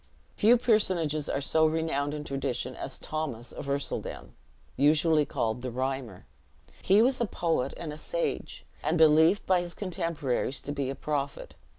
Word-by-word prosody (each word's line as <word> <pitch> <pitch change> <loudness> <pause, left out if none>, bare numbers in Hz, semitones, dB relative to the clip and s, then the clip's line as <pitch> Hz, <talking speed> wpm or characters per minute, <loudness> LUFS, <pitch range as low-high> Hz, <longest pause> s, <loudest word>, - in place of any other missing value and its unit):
Few 230 +4 +5
personages 180 - +1
are 140 - -1
so 160 +3 +3
renowned 155 -2 -1
in 150 - -5
tradition 135 -3 -3
as 135 - -6
Thomas 140 -7 -4
of 140 - -7
Ercildown, 140 0 -3 0.4
usually 150 +2 +4
called 110 +1 -2
the 130 - -3
Rhymer. 130 -5 -4 0.6
He 200 +4 +5
was 255 0 +2
a - - +3
poet 165 -8 -1
and 160 -3 -5
a - - -8
sage, - - -3 0.2
and 155 +4 0
believed 160 +4 +5
by 185 -2 +3
his 175 -1 -7
contemporaries 165 -9 -2
to 145 - -5
be 140 -2 -2
a 135 - -3
prophet. 140 -2 -3
150 Hz, 160 wpm, -28 LUFS, 135-170 Hz, 0.6 s, Few